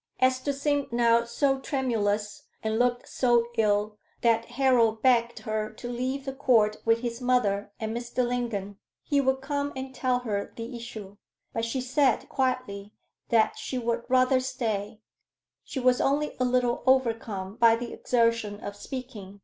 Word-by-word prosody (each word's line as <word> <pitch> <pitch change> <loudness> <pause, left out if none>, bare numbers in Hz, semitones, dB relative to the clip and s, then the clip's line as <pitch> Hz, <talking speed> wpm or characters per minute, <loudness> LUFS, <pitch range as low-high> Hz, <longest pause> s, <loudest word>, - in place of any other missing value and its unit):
Esther 255 +2 +2
seemed 285 0 -1
now 235 0 +4
so 270 +3 +1
tremulous, 215 -7 -1 0.2
and 220 +1 0
looked 245 0 +1
so 240 -2 +2
ill, 210 -1 +1 0.2
that 230 -1 +3
Harold 240 -3 +2
begged 240 -2 +3
her 215 -1 -2
to 220 +3 -9
leave 255 +3 -3
the 270 - -3
Court 230 -6 +3
with 230 0 +3
his 240 0 -4
mother 210 -5 +1
and 220 0 -3
Mr. 240 +1 -1
Lingon. 220 -5 -3 0.3
He 285 -2 +2
would 265 0 +1
come 285 +1 -2
and 265 0 -6
tell 255 -1 +1
her 205 -4 -3
the 230 +2 -6
issue. 215 -4 -8 0.4
But 225 - -1
she 255 +3 -2
said, 260 0 +1
quietly, 235 -6 -2 0.4
that 225 -2 +2
she 260 - -4
would 235 -1 -1
rather 255 +1 +4
stay; 220 -5 -3 0.6
she 275 - -5
was 250 -1 +3
only 290 +2 +1
a 255 - +2
little 250 -1 +1
overcome 225 -6 +1
by 230 -2 +6
the 235 +1 -6
exertion 230 -4 +1
of 205 -1 -7
speaking. 210 -5 -8
240 Hz, 155 wpm, -27 LUFS, 220-255 Hz, 0.6 s, by